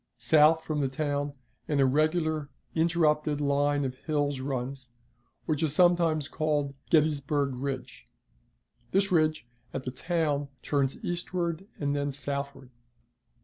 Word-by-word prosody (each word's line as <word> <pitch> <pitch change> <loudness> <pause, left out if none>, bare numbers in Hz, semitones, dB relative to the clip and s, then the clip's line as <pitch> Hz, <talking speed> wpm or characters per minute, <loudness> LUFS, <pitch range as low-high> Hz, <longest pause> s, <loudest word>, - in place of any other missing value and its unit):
South 155 +6 +5
from 155 -1 -2
the 135 - +2
town 145 +1 -2 0.3
an 145 -2 +1
irregular, 155 +2 +2 0.2
interrupted 155 -3 +2
line 145 0 +1
of 130 - -2
hills 145 0 -1
runs, 130 0 -4 0.6
which 155 -1 0
is 155 -2 +1
sometimes 170 -4 +3
called 150 -3 0
the - - -13 0.2
"Gettysburg 145 -3 +2
Ridge." 130 - -5 0.8
This 195 0 +1
ridge, 155 -6 +2 0.3
at 130 - -3
the 125 - -4
town, 145 0 -1 0.2
turns 140 -2 -1
eastward 175 0 -2
and 145 -1 0
then 145 0 -1
southward. 140 -1 -4
145 Hz, 125 wpm, -28 LUFS, 140-155 Hz, 0.8 s, South